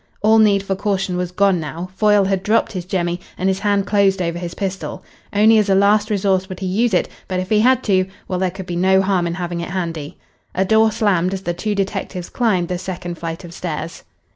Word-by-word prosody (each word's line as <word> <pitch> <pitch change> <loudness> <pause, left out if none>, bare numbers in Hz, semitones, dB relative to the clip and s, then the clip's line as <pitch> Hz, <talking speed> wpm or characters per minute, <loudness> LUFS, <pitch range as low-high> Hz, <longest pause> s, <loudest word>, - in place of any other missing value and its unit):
All 220 +1 +5
need 200 -2 +4
for 195 -1 -2
caution 195 -2 -1
was 180 0 -2
gone 195 -1 +2
now. 165 +3 -6
Foyle 210 -1 +4
had 190 -1 0
dropped 215 +4 +1
his 185 -4 -5
jemmy 175 -2 -1 0.2
and 185 - -1
his 190 0 +1
hand 200 -1 +1
closed 200 -2 +2
over 170 -1 -2
his 175 -1 -6
pistol. 190 -1 -4 0.3
Only 215 +2 +5
as 210 -1 +1
a 195 - +4
last 205 +2 +3
resource 190 -2 +1
would 185 - -7
he 190 - -4
use 220 +6 +1
it, - - +2 0.2
but 185 -1 -2
if 185 +1 -4
he 215 - +4
had 255 +3 +3
to 185 -3 +2 0.2
well, 185 - -2
there 185 0 +1
could 190 +1 -8
be 175 - -4
no 190 +2 +3
harm 190 -3 +1
in 170 - -3
having 175 -2 -4
it 170 - -5
handy. 165 -5 -4 0.4
A 190 - +2
door 220 +2 +4
slammed 195 -4 +1
as 190 - -7
the 175 - -1
two 210 +4 -2
detectives 195 -2 -3
climbed 190 -8 +1
the 180 0 -3
second 175 -2 -6
flight 165 +1 -5
of 170 -1 -10
stairs. 165 -1 -5
190 Hz, 235 wpm, -19 LUFS, 175-205 Hz, 0.4 s, All